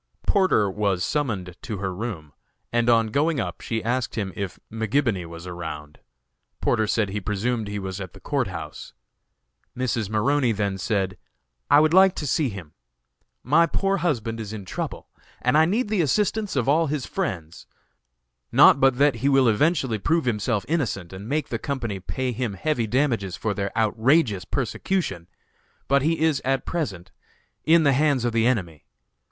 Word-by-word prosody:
Porter 185 - +3
was 95 -2 0
summoned 100 - -2
to 115 -5 -5
her 95 -1 -3
room, 90 - -6 0.4
and 120 0 +2
on 115 -1 +4
going 150 +3 +1
up 90 -6 -4
she 110 -1 -3
asked 120 +1 -1
him 100 -4 -3
if 95 -3 -4
McGibony 110 -4 0
was 85 +1 -10
around. 80 -4 -7 0.6
Porter 110 -2 +1
said 105 -1 +1
he 105 +2 -3
presumed 105 +3 -1
he 105 0 -4
was 95 0 -5
at 95 -3 -7
the - - -13
Court - - -1
House. - - -8 0.8
Mrs. 120 -5 -1
Maroney 120 +3 +2
then 100 -2 -2
said: 95 -2 -1 0.5
"I 145 - +7
would 155 +1 +3
like 190 0 +6
to 150 - -4
see 140 +1 +1
him! 95 -8 -9 0.7
My 160 +6 +4
poor 195 +2 0
husband 115 - -1
is 110 -2 -6
in 100 -3 -7
trouble - - -5 0.3
and 125 +3 +1
I 155 +1 +6
need 215 +8 0
the 205 -3 +1
assistance 210 +5 0
of 130 -3 0
all 160 +3 +3
his 145 -2 -2
friends, 90 - -4 0.8
not 140 - +7
but 135 -2 +4
that 140 -3 +3
he 135 +5 +1
will 135 -2 +4
eventually 130 0 +2
prove 165 +7 +1
himself 110 -2 0
innocent 110 - -2
and 100 +4 -8
make 150 +2 -1
the - - -3
company 120 -8 -3
pay 130 +7 -3
him 120 -3 -3
heavy 125 0 -1
damages 115 - 0
for 105 +5 -2
their 100 -1 -3
outrageous 110 - +2
persecution! 125 - -2 0.6
but 140 0 +3
he 160 +3 0
is, 160 -3 +2
at 135 +1 0
present, 100 - -4 0.5
in 165 +1 +5
the 140 -2 +4
hands 140 -3 +2
of 120 - 0
the 115 0 +3
enemy. 90 - -2
115 Hz, 170 wpm, -24 LUFS, 100-145 Hz, 0.8 s, I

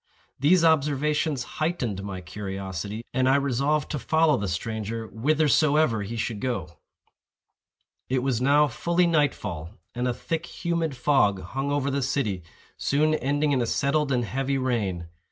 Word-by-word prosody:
These 165 +6 +4
observations 150 -2 +2 0.2
heightened 130 - -1
my 95 -2 -5
curiosity, 95 +3 -5
and 130 0 +2
I 135 - +5
resolved 140 +2 +1
to 150 - -2
follow 160 +2 +3
the 100 - -2
stranger 110 +5 -3
whithersoever 150 -1 +2
he 105 +4 -5
should 110 -1 -2
go. 85 - -4 1.3
It 130 -1 +1
was 130 -3 0
now 145 +3 +5
fully 170 +7 +1
night 150 -5 +2
fall, 85 -5 -6 0.2
and 125 +1 -1
a 125 - +1
thick 165 +5 -3 0.2
humid 165 -5 0
fog 105 -8 +2
hung 135 +9 -3
over 140 -1 0
the 140 +1 0
city, 120 -8 -1 0.4
soon 155 +2 +2
ending 145 +1 +1
in 130 -3 +2
a 120 - 0
settled 140 +3 +1
and 125 -2 +1
heavy 135 +3 -1
rain. 105 -10 -1
130 Hz, 155 wpm, -26 LUFS, 110-150 Hz, 1.3 s, I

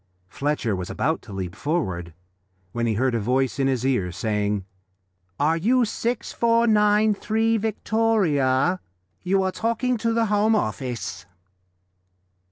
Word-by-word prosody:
Fletcher 135 -2 -1
was 90 -1 -5
about 160 +4 -1
to 110 - -13
leap 95 -1 -5
forward 95 - -2 0.6
when 120 +2 -1
he 110 - 0
heard 130 +3 +1
a 115 - +1
voice 130 +4 0
in 135 - +2
his 130 -2 0
ear 120 -10 +1
saying 105 0 -1 0.7
"Are 155 +3 +2
you 240 +8 +3
6493 225 -1 +2
Victoria? 190 -9 +1 0.4
You 195 +1 +1
are 190 - 0
talking 235 +4 -1
to 230 +1 0
the 230 0 +2
Home 210 +1 +2
Office." 115 - -3
155 Hz, 125 wpm, -24 LUFS, -, 0.7 s, you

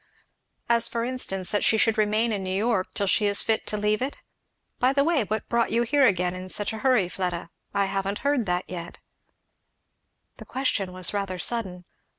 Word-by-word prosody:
"As 235 0 +4
for 230 0 -2
instance, 195 -7 -1
that 205 - +1
she 220 - +4
should 225 0 +3
remain 215 +2 +1
in 200 -3 -2
New 185 0 -2
York 215 -3 0
till 200 - 0
she 205 +2 +2
is 200 0 +2
fit 220 -1 0
to 210 - -1
leave 210 +1 0
it? 270 +2 -3 0.6
By 255 +2 +3
the 280 0 +3
way, 305 -7 +2
what 215 +2 -3
brought 235 -1 +1
you 235 +2 +2
here 275 +2 +4
again 180 -3 +1
in 185 0 -7
such 205 +3 0
a 220 - -5
hurry, 250 -7 +3
Fleda? 175 -2 -4 0.2
I 200 -1 +1
haven't 195 +1 -2
heard 280 -7 +1
that 180 0 0
yet." 175 -1 -7 1.4
The - - -10
question 235 -8 -1
was 185 +1 -2
rather 195 -2 -2
sudden. 180 -3 -1
210 Hz, 195 wpm, -25 LUFS, 185-235 Hz, 1.4 s, As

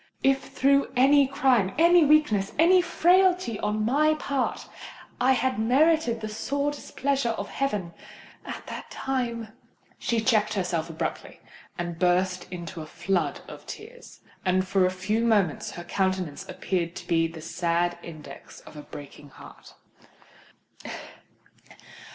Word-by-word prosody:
If 270 0 +2
through 275 +1 +2
any 275 +2 +5
crime—any 270 - +4
weakness—any 305 - +4
frailty 360 - +3
on 210 +1 -1
my 305 +6 +3
part, 280 -3 -2 0.5
I 260 +2 +4
had 260 -2 0
merited 260 +1 +3
the 215 - -3
sore 280 +7 -2
displeasure 275 -3 -2
of 200 - -5
heaven—at 205 -11 -6
that - - -8
time——" 235 -4 -3 0.5
She 235 - 0
checked 215 -2 +2
herself 175 -4 -1
abruptly, 160 - -5 0.4
and 175 -1 -4
burst 180 +1 +1
into 175 -1 -6
a 155 - -8
flood 175 -2 -1
of - - -11
tears; 485 +3 -11 0.2
and 185 0 +1
for 190 -1 +3
a - - +1
few 185 +5 -1
moments 205 -9 +1
her 175 - -7
countenance 185 -4 -2
appeared 170 -3 -2
to - - -8
be 165 -1 +2
the 165 0 -10
sad 170 +1 -1
index 155 -5 -11
of - - -15
a 150 - -8
breaking 145 0 -11
heart. - - -15
215 Hz, 125 wpm, -26 LUFS, 175-275 Hz, 0.5 s, any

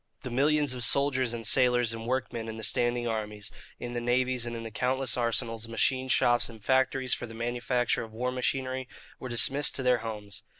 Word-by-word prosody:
The 130 - -6
millions 145 +2 +2
of 125 -1 -2
soldiers 130 -2 +3
and 115 -1 -4
sailors 125 -1 +4
and 115 0 -7
workmen 120 -3 -2
in 110 0 -6
the 110 - -7
standing 120 +1 +1
armies, 105 -2 -3 0.3
in 120 0 -6
the 120 - -2
navies, 125 0 0
and 120 - -4
in 115 - -6
the 115 - -7
countless 130 +2 0
arsenals, 115 -1 -1
machine 130 +3 +1
shops, 120 -2 +3
and 110 -3 -13
factories 130 -1 +2
for 120 - -3
the 115 - -10
manufacture 120 +1 -1
of 115 - -8
war 125 +3 -2
machinery, 130 0 -2 0.3
were 130 - -6
dismissed 135 +4 +2
to 130 - -1
their 125 -1 +3
homes. 105 -3 -6
120 Hz, 200 wpm, -28 LUFS, 115-130 Hz, 0.3 s, sailors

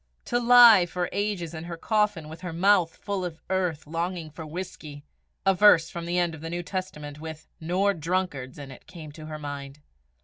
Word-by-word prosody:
To 240 - 0
lie 235 -6 +8
for 175 0 -3
ages 200 -5 -2
in 160 0 -6
her 170 -1 -6
coffin, 210 -5 0
with 160 +1 -10
her 180 -2 -5
mouth 175 0 +3
full 200 -2 -3
of 165 -3 -5
earth, 180 -5 -1
longing 165 +1 -4
for 160 +2 -8
whisky! 155 -3 -7 0.4
A 195 - +5
verse 180 -4 +5
from 170 -1 -6
the 175 +1 -1
end 175 -2 +1
of 155 - -10
the 165 - -5
New 175 +1 -3
Testament 160 -6 -6
with 160 -1 -8
"nor 185 +5 +1
drunkards" 165 -6 -3
in 140 -2 -9
it, 130 - -14
came 160 -4 -10
to 155 +1 -10
her 155 -1 -6
mind. 145 -1 -7
170 Hz, 200 wpm, -26 LUFS, 155-185 Hz, 0.4 s, lie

